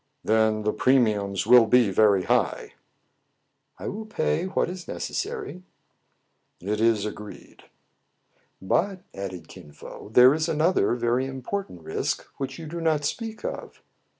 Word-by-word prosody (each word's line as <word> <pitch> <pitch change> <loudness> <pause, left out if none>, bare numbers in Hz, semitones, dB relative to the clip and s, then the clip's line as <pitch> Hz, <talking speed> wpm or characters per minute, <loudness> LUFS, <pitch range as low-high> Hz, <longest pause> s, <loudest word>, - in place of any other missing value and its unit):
"Then 110 -1 +2
the 105 - 0
premiums 105 -7 +1
will 120 0 +7
be 120 -3 +4
very 100 -1 +4
high." - - 0 0.5
" - - -49
I - - -7
will 215 +2 -5
pay 175 -3 -1
what 190 - 0
is 180 0 -8
necessary." 420 - -5 1.0
"It 105 +4 -2
is 115 -2 +2
agreed." 105 -1 -9 0.9
"But," 185 - -1
added 95 -4 -7
Kin 75 - -13
Fo, 90 - -11
"there 125 +4 +7
is 160 +2 -1
another 160 -4 +2
very 120 +2 0
important 135 - -5
risk, 80 - -3
which 135 -1 -5
you 165 - -8
do 165 +2 -6
not 155 -3 +1
speak 220 +7 -4
of." - - -7
125 Hz, 140 wpm, -25 LUFS, 105-165 Hz, 1.0 s, will